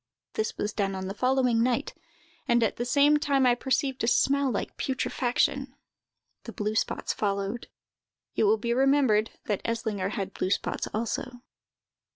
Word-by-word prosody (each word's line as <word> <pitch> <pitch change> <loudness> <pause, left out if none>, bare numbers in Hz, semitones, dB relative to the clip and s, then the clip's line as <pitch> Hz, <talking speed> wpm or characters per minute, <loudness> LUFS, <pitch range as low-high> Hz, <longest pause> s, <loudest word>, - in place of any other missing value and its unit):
This 220 - -2
was 210 +1 -2
done 195 -2 -1
on 190 0 -4
the 195 - -4
following 250 0 +2
night, 245 0 0 0.5
and, 240 -2 +3
at 220 - 0
the 240 - -2
same 285 +4 +4
time, 280 -3 +2
I 245 - +5
perceived 265 +1 -1
a - - +1
smell 280 +3 +3
like 230 - -3
putrefaction. 265 +1 -1 0.7
The 230 - -6
blue 210 0 -2
spots 220 - -1
followed." 200 +2 -2 0.7
(It - - +2
will 215 +2 +4
be 235 +2 -1
remembered 260 -5 +3 0.2
that 205 -3 -1
Eslinger 220 -4 -2
had 195 -1 -4
blue 185 - -2
spots 200 - -1
also.) 240 +3 -3
235 Hz, 160 wpm, -27 LUFS, 210-265 Hz, 0.7 s, I